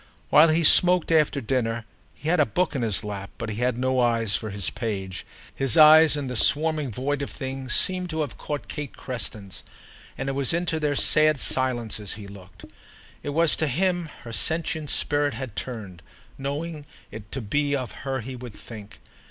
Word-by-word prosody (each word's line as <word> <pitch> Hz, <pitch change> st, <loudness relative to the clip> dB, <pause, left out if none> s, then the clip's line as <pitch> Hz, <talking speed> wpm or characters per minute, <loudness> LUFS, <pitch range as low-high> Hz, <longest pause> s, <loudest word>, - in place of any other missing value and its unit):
While 155 Hz, +2 st, +7 dB
he 160 Hz, +2 st, +2 dB
smoked, 180 Hz, +2 st, +6 dB
after 150 Hz, -3 st, +2 dB
dinner, 115 Hz, -2 st, -1 dB, 0.3 s
he 150 Hz, -, -9 dB
had 175 Hz, +1 st, +2 dB
a 150 Hz, -, +5 dB
book 180 Hz, -, 0 dB
in 130 Hz, -, -1 dB
his 110 Hz, -3 st, -1 dB
lap, 100 Hz, -1 st, -6 dB
but 115 Hz, -, -5 dB
he 105 Hz, -, -5 dB
had 125 Hz, 0 st, 0 dB
no 130 Hz, +1 st, 0 dB
eyes 115 Hz, -4 st, +2 dB
for 110 Hz, -, -3 dB
his 100 Hz, -7 st, -3 dB
page: 95 Hz, -4 st, -5 dB, 0.3 s
his 135 Hz, -4 st, +1 dB
eyes, 155 Hz, 0 st, +7 dB
in 145 Hz, -, -3 dB
the 125 Hz, -1 st, -5 dB
swarming 150 Hz, +1 st, +4 dB
void 140 Hz, +5 st, -2 dB
of 140 Hz, -, -4 dB
things, 130 Hz, -2 st, -4 dB
seemed 185 Hz, -1 st, 0 dB
to 160 Hz, -1 st, -2 dB
have 145 Hz, -5 st, -4 dB
caught 145 Hz, -1 st, -5 dB
Kate 150 Hz, -4 st, -6 dB
Creston's, 105 Hz, -6 st, -6 dB, 0.6 s
and 135 Hz, -, -4 dB
it -, -, 0 dB
was 135 Hz, 0 st, 0 dB
into 170 Hz, -1 st, -1 dB
their 150 Hz, -2 st, 0 dB
sad 155 Hz, 0 st, +4 dB
silences 120 Hz, -7 st, 0 dB
he 105 Hz, -1 st, -9 dB
looked. 100 Hz, -2 st, -13 dB, 0.6 s
It -, -, -5 dB
was 160 Hz, +2 st, +3 dB
to 155 Hz, -, 0 dB
him 175 Hz, +3 st, 0 dB
her 115 Hz, -1 st, -8 dB
sentient 160 Hz, +4 st, -1 dB
spirit 145 Hz, -3 st, 0 dB
had 125 Hz, -4 st, -6 dB
turned, 105 Hz, -9 st, -6 dB, 0.3 s
knowing 145 Hz, +2 st, -5 dB, 0.2 s
it 105 Hz, -1 st, -10 dB
to 135 Hz, -, -2 dB
be 145 Hz, +6 st, 0 dB
of 130 Hz, -3 st, -4 dB
her 135 Hz, -1 st, -3 dB
he 130 Hz, +3 st, -7 dB
would 120 Hz, -3 st, -9 dB
think. 105 Hz, -3 st, -10 dB
135 Hz, 190 wpm, -25 LUFS, 115-155 Hz, 0.6 s, While